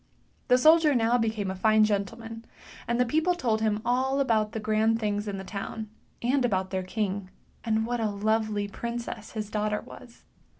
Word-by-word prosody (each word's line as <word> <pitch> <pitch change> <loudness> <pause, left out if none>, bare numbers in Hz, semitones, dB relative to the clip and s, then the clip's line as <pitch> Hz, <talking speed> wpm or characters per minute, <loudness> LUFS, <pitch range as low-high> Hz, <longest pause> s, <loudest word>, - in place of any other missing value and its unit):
The 250 - +5
soldier 310 +1 +5
now 235 +1 +3
became 220 -4 -1
a - - -5
fine 215 +3 +4
gentleman, 225 +2 -2 0.4
and 235 +1 0
the 250 - +4
people 320 +8 +1
told 230 -9 0
him 215 0 0
all 260 +3 +1
about 220 -5 +2
the 220 - -4
grand 220 +1 +1
things 210 -1 -1
in 200 -1 -3
the 190 - -6
town, 210 +2 -6 0.3
and 260 +2 +2
about 190 -5 0
their 190 -1 -1
king, 195 0 -3 0.3
and 220 -1 +1
what 240 +1 -2
a 220 -2 0
lovely 210 0 0
princess 235 0 -6
his 215 -1 -5
daughter 210 0 -1
was. 235 -2 -14
220 Hz, 180 wpm, -27 LUFS, 210-235 Hz, 0.4 s, The